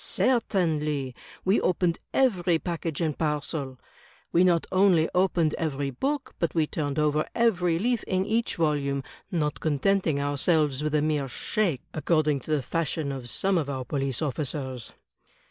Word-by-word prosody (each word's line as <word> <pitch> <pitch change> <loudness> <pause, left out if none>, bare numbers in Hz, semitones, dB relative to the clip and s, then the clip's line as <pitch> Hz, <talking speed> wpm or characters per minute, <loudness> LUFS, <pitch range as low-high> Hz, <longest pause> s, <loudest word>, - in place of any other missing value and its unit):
"Certainly; 155 - 0 0.3
we 190 +3 +3
opened 180 -1 +1
every 185 -10 +2
package 165 -2 -3
and 155 -3 0
parcel; 150 -3 -2 0.5
we 175 - +4
not 175 -3 +3
only 185 -4 +4
opened 180 -4 +2
every 145 -3 -1
book, 275 - -2
but 170 - -1
we 160 -2 +3
turned 145 -2 -3
over 150 0 +1
every 180 -8 +2
leaf 235 +4 0
in 185 0 0
each 230 +2 0
volimie, 145 -4 0 0.3
not 150 -5 -1
contenting 160 +1 +1
ourselves 145 0 +1
with 155 0 -1
a 150 - +2
mere 150 -3 0
shake, 170 - -1
according 155 -2 +1
to - - -14
the 150 -3 +1
fashion 155 +1 -2
of 130 -3 -6
some 190 - +1
of 145 -3 -3
our 130 -2 -3
police 135 0 -1
officers. 130 -4 -3
155 Hz, 150 wpm, -27 LUFS, 145-180 Hz, 0.5 s, we